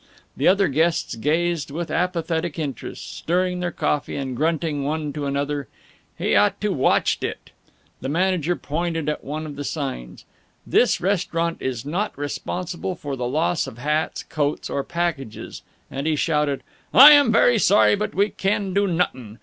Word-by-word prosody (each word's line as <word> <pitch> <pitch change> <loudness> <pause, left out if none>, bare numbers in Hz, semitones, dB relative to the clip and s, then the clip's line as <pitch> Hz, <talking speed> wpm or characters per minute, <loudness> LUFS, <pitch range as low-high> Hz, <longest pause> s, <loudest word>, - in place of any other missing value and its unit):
The - - +1
other 195 +1 +4
guests 160 +4 +1
gazed 160 +4 0
with 165 +4 -5
apathetic 170 -2 -1
interest, 145 -7 -6
stirring 180 +1 0
their 180 0 -1
coffee 150 -2 -1
and 135 -2 -3
grunting 155 0 0
one 150 0 -2
to 145 -2 -3
another, 140 0 -2 0.5
"He - - +1
ought - - +3
to - - 0
watched - - +2
it." - - -5 0.5
The 130 - -4
manager 175 +1 +1
pointed 165 0 -3
at 150 - -3
one 155 +3 -4
of 150 -2 -7
the 145 - -4
signs, 135 - -5 0.4
"This - - +3
restaurant 170 -3 -1
is 125 -1 -3
not 185 +8 -2
responsible 175 +5 -4
for 145 -3 -5
the 125 -2 -3
loss 160 +5 0
of 115 - -9
hats, 150 +5 -1
coats, 145 -1 -2
or 140 - -1
packages," 165 -9 -4 0.3
and 135 +3 -3
he 160 - +2
shouted, 150 -2 0 0.3
"I 285 +3 +10
am 285 -5 +6
very 240 -1 +4
sorry, 205 +1 +5
but 210 +1 -2
we 200 +2 +3
can 195 -1 -1
do 200 +1 +2
nuttin'. 130 - -2
160 Hz, 165 wpm, -23 LUFS, 145-180 Hz, 0.5 s, I